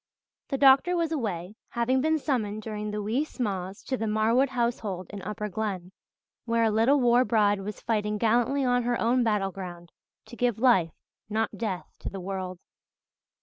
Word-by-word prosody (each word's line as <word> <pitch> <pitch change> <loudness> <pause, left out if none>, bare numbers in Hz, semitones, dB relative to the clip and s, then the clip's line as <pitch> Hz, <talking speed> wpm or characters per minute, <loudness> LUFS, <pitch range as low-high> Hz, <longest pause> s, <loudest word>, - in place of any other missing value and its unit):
The 275 - -2
doctor 275 +7 +5
was 335 -1 0
away, 205 - -3
having 250 +2 +1
been 315 +2 +2
summoned 215 -8 -2
during 210 -1 -4
the 210 0 -3
wee 230 +8 0
sma's 195 -9 -4
to 260 - -2
the 225 - -2
Marwood 225 +5 +2
household 235 -7 -2
in 205 -1 -7
Upper 210 +2 -4
Glen, 195 -3 -4 0.5
where 230 -1 +1
a 220 - +3
little 230 +7 +4
war 245 0 +4
bride 205 -4 +2
was 205 +1 -6
fighting 210 -2 -1
gallantly 240 +5 +2
on 245 0 +3
her 240 0 0
own 245 +2 +2
battleground 190 -5 -2 0.3
to - - -11
give 240 -2 0
life, 220 -10 +3 0.3
not 220 +1 -1
death, 200 -6 -3
to - - -5
the 195 - -7
world. 185 -1 -4
220 Hz, 170 wpm, -27 LUFS, 200-245 Hz, 0.5 s, doctor